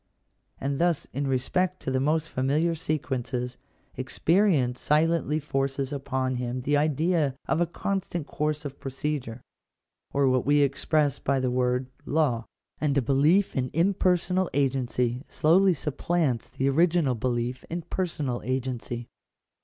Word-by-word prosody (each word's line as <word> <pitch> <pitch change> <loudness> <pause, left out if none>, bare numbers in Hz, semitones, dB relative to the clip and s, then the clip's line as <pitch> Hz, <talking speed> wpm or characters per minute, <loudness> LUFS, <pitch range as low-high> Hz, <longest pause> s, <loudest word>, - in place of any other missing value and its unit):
And 140 +2 -2
thus 175 -3 +2
in 140 +2 -1
respect 180 +8 0
to 135 - -3
the 130 - +1
most 155 +3 +1
familiar 150 +6 +1
sequences, 130 -5 -3 0.4
experience 140 -1 +2
silently 155 0 +2
forces 135 -1 -2
upon 130 -2 -1
him 125 +1 -3
the 145 +4 +1
idea 150 0 +1
of 165 - +1
a 175 - +2
constant 175 -2 -3
course 150 0 -2
of 140 -1 -6
procedure 135 -3 -4 0.3
— - - -59
or 140 -1 +2
what 130 -1 +2
we 145 +1 +4
express 145 +1 +1
by 135 0 +1
the 130 -1 0
word 125 0 +1 0.2
law; 140 -7 +1 0.3
and 145 -2 +1
a - - +4
belief 150 - +3
in 130 -1 0
impersonal 180 +1 +2
agency 125 -2 0
slowly 180 +4 +4
supplants 150 -3 -1
the 135 - -1
original 160 -1 +3
belief 120 +1 -2
in 170 +1 -3
personal 150 -10 -2
agency. 125 -1 -3
140 Hz, 140 wpm, -27 LUFS, 130-160 Hz, 0.4 s, we